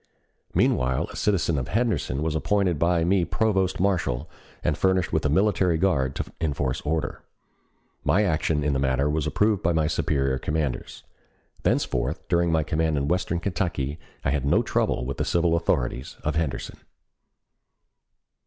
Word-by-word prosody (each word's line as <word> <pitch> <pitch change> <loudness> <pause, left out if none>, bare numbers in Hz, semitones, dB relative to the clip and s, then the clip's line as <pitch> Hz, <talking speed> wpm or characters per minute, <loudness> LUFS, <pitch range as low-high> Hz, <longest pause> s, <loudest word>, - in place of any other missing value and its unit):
Meanwhile 65 0 +2
a - - -10
citizen 85 -7 +1
of 65 - -4
Henderson 95 - 0
was 80 -1 0
appointed 90 0 +1
by 85 +1 +2
me 90 +1 +3
provost 95 +1 0
marshal 80 -8 0 0.4
and 75 - +1
furnished 95 0 +1
with 80 - +1
a - - -1
military 95 0 +2
guard 75 -8 +1
to - - -2 0.2
enforce 70 -5 -1
order. 80 +1 -2 0.8
My 105 - +3
action 80 -4 +1
in 75 0 +1
the 70 - 0
matter 70 +1 +1
was 75 -1 -1
approved 105 -2 +2
by 85 - +1
my 80 -1 +2
superior 70 -3 0
commanders. 75 -4 -3 0.6
Thenceforth 75 +8 -1
during 85 -1 +2
my 80 -1 +2
command 80 0 0
in 70 +1 -1
western 85 -1 0
Kentucky 85 -6 -2 0.3
I 65 - +2
had 70 -2 0
no 70 - +3
trouble - - 0
with 70 +1 -4
the - - 0
civil 85 -1 +2
authorities 60 -5 -1
of 75 - 0
Henderson. 80 -4 -2
80 Hz, 155 wpm, -25 LUFS, 70-90 Hz, 0.8 s, me